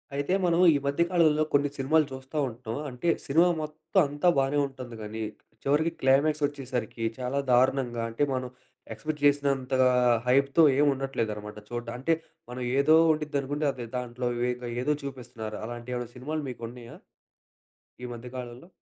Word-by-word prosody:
అయితే 145 Hz, +5 st, 0 dB
మనం 170 Hz, 0 st, +2 dB
ఈ -, -, +3 dB
మధ్య 140 Hz, +4 st, 0 dB
కాలంలో 155 Hz, -3 st, +4 dB
కొన్ని 145 Hz, 0 st, +3 dB
సినిమాలు 150 Hz, +3 st, +3 dB
చూస్తా 130 Hz, +3 st, -7 dB
ఉంటాం. 115 Hz, 0 st, -6 dB
అంటే 130 Hz, +7 st, -2 dB, 0.2 s
సినిమా 165 Hz, +6 st, +5 dB
మొత్తం 155 Hz, +4 st, -1 dB
అంతా 145 Hz, +5 st, +2 dB
బాగానే 135 Hz, +2 st, +2 dB
ఉంటుంది. 130 Hz, -3 st, -9 dB
కానీ, 110 Hz, +1 st, -6 dB, 0.4 s
చివరికి 150 Hz, +4 st, +2 dB
క్లైమాక్స్ 145 Hz, +3 st, +3 dB
వచ్చేసరికి 130 Hz, -5 st, -4 dB, 0.2 s
చాలా 130 Hz, +2 st, -1 dB
దారుణంగా, 125 Hz, -1 st, +2 dB
అంటే 115 Hz, +5 st, -1 dB
మనం 130 Hz, -1 st, -2 dB, 0.5 s
ఎక్స్‌పెక్ట్ 150 Hz, +7 st, -5 dB
చేసినంతగా 135 Hz, -2 st, +3 dB, 0.4 s
హైప్‌తో 140 Hz, +5 st, +4 dB
ఏమి 145 Hz, +1 st, +4 dB
ఉండట్లేదనమాట 110 Hz, -6 st, -4 dB
చూడ్డా 120 Hz, -1 st, -4 dB
అంటే 165 Hz, +6 st, +2 dB, 0.4 s
మనం 125 Hz, +1 st, -6 dB, 0.2 s
ఏదో 155 Hz, +3 st, +5 dB, 0.2 s
ఉండిది 150 Hz, -2 st, -1 dB
అనుకుంటే, 145 Hz, +3 st, -2 dB
అది 125 Hz, -3 st, -7 dB
దాంట్లో 125 Hz, 0 st, -3 dB, 0.2 s
వేదో 125 Hz, 0 st, -2 dB
ఏదో 150 Hz, +4 st, +2 dB
చూపిస్తున్నారు. 120 Hz, -5 st, -6 dB
అలాంటి 120 Hz, +1 st, -7 dB
ఏమైనా 120 Hz, -1 st, -5 dB
సినిమాలు 150 Hz, +5 st, -4 dB
మీకు 120 Hz, -2 st, -8 dB
ఉన్నాయా? 120 Hz, -1 st, -11 dB, 1.1 s
ఈ -, -, -3 dB
మధ్య 120 Hz, +1 st, -9 dB
కాలంలో? 125 Hz, +4 st, -8 dB
135 Hz, 150 wpm, -28 LUFS, 120-145 Hz, 1.1 s, సినిమా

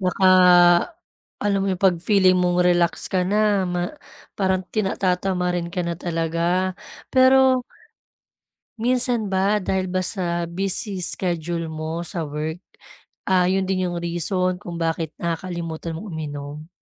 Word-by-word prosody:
naka, 185 Hz, 0 st, +1 dB, 1.2 s
alam 200 Hz, -1 st, +1 dB
mo 195 Hz, -, -1 dB
'yung 185 Hz, 0 st, -2 dB
'pag 180 Hz, -3 st, +4 dB
feeling 185 Hz, -1 st, +4 dB
mong 180 Hz, 0 st, +2 dB
relax 175 Hz, -1 st, +1 dB
ka 185 Hz, -, +2 dB
na 205 Hz, -1 st, +2 dB
ma 175 Hz, 0 st, -2 dB, 0.6 s
parang 190 Hz, -1 st, +1 dB
tinata 195 Hz, -3 st, 0 dB
tatatamarin 180 Hz, -2 st, -1 dB
ka 180 Hz, -, -1 dB
na 170 Hz, -, -2 dB
talaga 170 Hz, +2 st, 0 dB, 0.4 s
pero 260 Hz, -1 st, +5 dB, 1.2 s
minsan 240 Hz, -3 st, 0 dB
ba 195 Hz, +3 st, +2 dB
dahil 190 Hz, -1 st, -1 dB
ba 185 Hz, 0 st, -1 dB
sa 175 Hz, -3 st, -1 dB
busy 190 Hz, +3 st, -3 dB
schedule 170 Hz, -2 st, -2 dB
mo 160 Hz, +2 st, -4 dB
sa 165 Hz, -2 st, -4 dB
work, 155 Hz, +4 st, -4 dB, 0.7 s
ah, 180 Hz, -1 st, +3 dB
'yun 190 Hz, 0 st, +1 dB
din 185 Hz, -1 st, -1 dB
'yung 175 Hz, -, -4 dB
reason 180 Hz, +2 st, -1 dB
kung 175 Hz, -1 st, -7 dB
bakit 165 Hz, -1 st, -2 dB
nakakalimutan 165 Hz, -1 st, -4 dB
mong 205 Hz, +5 st, -8 dB
uminom? 150 Hz, 0 st, -6 dB
180 Hz, 135 wpm, -22 LUFS, 170-195 Hz, 1.2 s, pero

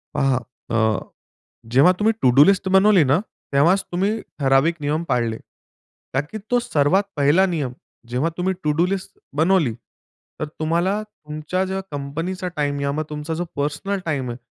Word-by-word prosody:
पहा 135 Hz, -1 st, +2 dB, 0.4 s
अ, 115 Hz, -, +2 dB, 0.9 s
जेव्हा 140 Hz, +8 st, +7 dB
तुम्ही 220 Hz, +2 st, +3 dB
टू 130 Hz, -, +5 dB
डू 145 Hz, -, +10 dB
लिस्ट 195 Hz, -1 st, +3 dB
बनवली 190 Hz, -2 st, +5 dB
ना, 140 Hz, +6 st, +3 dB, 0.3 s
तेव्हाच 170 Hz, +8 st, +4 dB
तुम्ही 190 Hz, +4 st, +1 dB, 0.3 s
ठराविक 135 Hz, +4 st, +3 dB
नियम 150 Hz, +3 st, -1 dB
पाळले. 115 Hz, -2 st, 0 dB, 0.8 s
कारण 135 Hz, +2 st, 0 dB
की 215 Hz, -, -4 dB
तो 245 Hz, -, +4 dB
सर्वात 190 Hz, -4 st, +2 dB
1ला 150 Hz, +7 st, +4 dB
नियम 150 Hz, -8 st, -2 dB, 0.4 s
जेव्हा 130 Hz, +7 st, 0 dB
तुम्ही 190 Hz, +1 st, 0 dB
टू 150 Hz, -, +2 dB
डू 175 Hz, -, +5 dB
लिस्ट 190 Hz, 0 st, -4 dB, 0.2 s
बनवली, 160 Hz, -5 st, +3 dB
तर 125 Hz, +5 st, -12 dB
तुम्हाला 170 Hz, +6 st, +1 dB
तुमच्या 155 Hz, -2 st, -4 dB
ज्या 190 Hz, +1 st, -3 dB
कंपनीचा 165 Hz, +7 st, -4 dB
टाईम 145 Hz, -1 st, 0 dB
किंवा 140 Hz, +2 st, -1 dB
तुमचा 150 Hz, +2 st, -4 dB
जो 175 Hz, +2 st, -2 dB
पर्सनल 150 Hz, +8 st, -2 dB
टाईम 140 Hz, -6 st, -2 dB
आहे. 120 Hz, -, -5 dB
155 Hz, 155 wpm, -22 LUFS, 140-190 Hz, 0.9 s, डू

